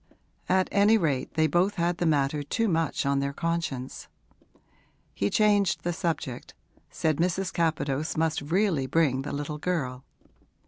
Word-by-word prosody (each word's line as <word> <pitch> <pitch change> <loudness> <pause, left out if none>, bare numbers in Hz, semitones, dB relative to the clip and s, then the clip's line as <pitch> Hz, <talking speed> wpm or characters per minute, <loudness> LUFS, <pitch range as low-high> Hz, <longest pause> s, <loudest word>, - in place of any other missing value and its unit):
At 185 0 +3
any 205 +3 +5
rate 145 -9 -1
they 160 0 +3
both 175 +6 +2
had 170 0 0
the 175 - +1
matter 145 -1 +1
too 225 - -1
much 165 -7 0
on 140 0 +2
their 140 0 -2
conscience. 165 -6 -3 1.1
He 100 - 0
changed 205 -2 +2
the 175 - -1
subject, 160 -7 -4 0.3
said 155 -2 0
Mrs. 180 +2 0
Capadose 155 -3 -1
must 160 0 +1
really 165 -2 +1
bring 135 -2 +2
the 135 - -5
little 145 +1 -4
girl. 135 -7 -2
160 Hz, 145 wpm, -27 LUFS, 140-175 Hz, 1.1 s, any